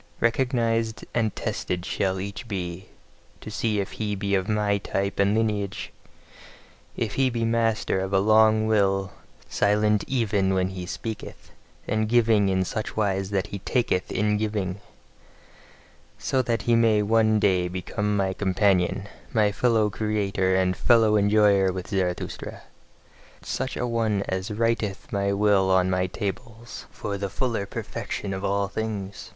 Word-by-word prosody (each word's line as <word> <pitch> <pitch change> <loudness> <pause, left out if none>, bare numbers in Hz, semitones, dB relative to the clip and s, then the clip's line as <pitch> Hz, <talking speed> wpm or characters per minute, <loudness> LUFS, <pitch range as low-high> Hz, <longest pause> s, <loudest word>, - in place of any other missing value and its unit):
Recognised 115 -2 0
and 110 -3 0
tested 90 -1 -3
shall 95 -2 -1
each 100 +5 -6
be, 95 -3 -5 0.5
to 110 - -9
see 110 -1 0
if 100 - -3
he 105 -2 -3
be 100 0 -2
of 95 0 +1
my 105 -1 +1
type 100 0 -2
and 100 +1 +3
lineage: 105 -3 -2 1.0
if 110 -4 -2
he 135 -1 +2
be 115 -2 -1
master 115 -3 +1
of 95 0 -3
a 100 - +3
long 110 +1 +4
will, 95 -3 +1 0.4
silent 105 0 +2
even 100 -7 +1
when 95 0 +1
he 90 -1 -6
speaketh, 110 +2 -7 0.4
and 110 0 0
giving 110 -4 +4
in 95 0 +1
such 110 +4 -4
wise 95 -2 0
that 100 -1 0
he 100 - -3
TAKETH 100 -4 0
in 105 +1 +1
giving: 105 -3 -2 1.4
So 130 - 0
that 115 -3 -1
he 120 - +3
may 110 -2 +4
one 110 0 +3
day 95 -4 +2
become 105 +3 -2
my 95 -1 0
companion, 95 0 +1 0.3
a 105 -2 +4
fellow 110 -1 +2
creator 100 -3 0
and 95 -1 +2
fellow 115 -1 +4
enjoyer 100 -2 +4
with 90 -1 -6
Zarathustra: 90 -3 -3 0.8
such 130 0 -3
a - - -1
one 110 -4 0
as 95 +2 -2
writeth 110 -2 -1
my 100 0 +1
will 100 -1 +3
on 95 0 +3
my 90 0 +1
tables, 115 +5 -6
for 100 -1 -5
the 100 0 -2
fuller 110 -1 -2
perfection 100 0 -5
of 95 +1 -5
all 100 0 0
things. 100 -1 -5
105 Hz, 150 wpm, -25 LUFS, 95-110 Hz, 1.4 s, long